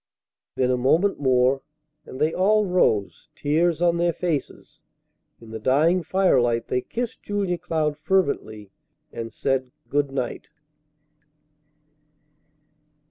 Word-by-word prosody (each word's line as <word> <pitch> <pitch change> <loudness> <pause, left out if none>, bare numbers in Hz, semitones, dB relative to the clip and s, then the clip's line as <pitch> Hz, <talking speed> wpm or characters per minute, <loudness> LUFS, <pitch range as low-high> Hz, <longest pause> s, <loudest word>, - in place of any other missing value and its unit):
Then 130 -1 +1
a 125 - +1
moment 160 +11 +2
more, 130 0 +2 0.5
and 130 - -9
they 155 +2 +1
all 210 +3 +3
rose, 145 - 0
tears 165 +3 +1
on 170 -1 +3
their 170 0 +1
faces. 165 -6 -4 0.6
In 115 -1 -13
the 110 - -6
dying 150 +10 +3
firelight 130 -11 +1
they 125 - 0
kissed 240 - -5
Julia 195 -4 -2
Cloud 155 -3 -2
fervently, 140 - -1 0.4
and 115 0 -6
said 130 0 -1 0.2
good 145 -1 0
night. 130 -3 -4
150 Hz, 115 wpm, -24 LUFS, 125-175 Hz, 0.6 s, all